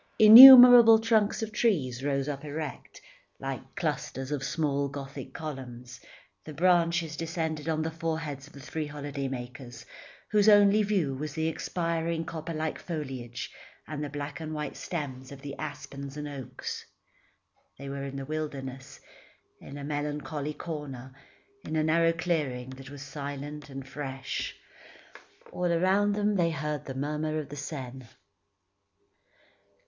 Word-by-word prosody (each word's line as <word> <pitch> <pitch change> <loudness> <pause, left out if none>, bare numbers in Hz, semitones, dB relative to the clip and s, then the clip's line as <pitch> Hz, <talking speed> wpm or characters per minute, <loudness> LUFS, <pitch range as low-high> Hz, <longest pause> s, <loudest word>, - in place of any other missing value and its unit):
Innumerable 245 0 +11
trunks 220 -1 +1
of 220 - -5
trees 145 - 0
rose 140 -1 -1
up 140 -1 -4
erect, 150 -1 -7 0.4
like - - -6
clusters 135 +2 -3
of 145 -3 -2
small 140 -3 -1
gothic 140 -1 -8
columns; 125 -5 -8 0.4
the 155 - -9
branches 170 -1 +2
descended 160 -2 -3
to 160 - +1
the 160 +1 -2
foreheads 160 -4 -4
of - - -18
the 140 - -12
three 155 +2 -4
holiday 145 -1 -5
makers, 125 -1 -8 0.5
whose 210 0 +5
only 205 0 +6
view 195 -9 0
was 150 +2 -6
the 160 0 -1
expiring 165 0 -2
copper 160 +1 -6
like 155 0 -3
foliage, 130 -8 -6 0.4
and 150 0 -5
the 145 - -4
black 145 +1 -6
and 155 -1 -5
white 150 0 -4
stems 135 -6 -6
of 140 -1 -10
the 140 -1 -6
aspens 140 -2 -7
and 150 0 -5
oaks. 140 -3 -7 0.9
They 140 - -9
were 140 0 -5
in 135 0 -7
the 135 0 -5
wilderness, 135 -3 -6 0.6
in 140 - -10
a 140 - -7
melancholy 145 0 -4
corner, 140 -5 -7 0.5
in - - -5
a 155 - +2
narrow 165 +1 +3
clearing 145 -7 -2
that 130 0 -11
was 140 -1 -9
silent 145 +1 -7
and 135 -1 -8
fresh. 135 -1 -5 1.0
All 180 -1 -1
around 190 +4 +2
them 205 0 0
they 170 -2 +2
heard 150 -2 -4
the 135 - -6
murmur 150 +3 -2
of 150 -3 -5
the 145 - -8
Seine. 130 -4 -7
150 Hz, 145 wpm, -28 LUFS, 135-165 Hz, 1.0 s, Innumerable